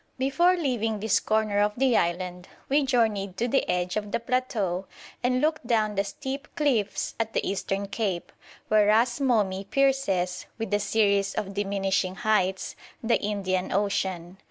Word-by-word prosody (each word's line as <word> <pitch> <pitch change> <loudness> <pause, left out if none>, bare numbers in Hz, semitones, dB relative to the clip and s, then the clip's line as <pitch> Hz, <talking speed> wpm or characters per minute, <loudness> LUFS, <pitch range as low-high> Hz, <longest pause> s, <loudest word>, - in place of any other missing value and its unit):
Before 310 +8 +3
leaving 230 -9 -1
this 220 +1 +2
corner 215 -1 +1
of 210 0 +2
the 260 -2 +3
island 180 +1 -1 0.2
we 285 +2 +3
journeyed 215 -7 +1
to 240 - 0
the 270 +3 +1
edge 180 0 0
of 210 -1 -3
the - - 0
plateau 225 -7 -1 0.3
and 250 +1 +1
looked 310 -5 0
down 215 -3 +2
the 200 0 +1
steep 265 +7 -6
cliffs 240 -9 0
at 225 -1 -1
the - - 0
eastern 195 0 -2
cape, 195 -4 -2 0.4
where 215 -1 +4
Ras 235 +5 +3
Momi 205 -7 +1
pierces, 205 -10 +1
with 225 -3 -4
a 205 - +3
series 200 -1 +1
of 195 -1 -3
diminishing 195 -2 0
heights, 195 -4 0 0.3
the 230 +1 +2
Indian 190 -3 -1
Ocean. 190 -2 -1
210 Hz, 155 wpm, -26 LUFS, 195-240 Hz, 0.4 s, where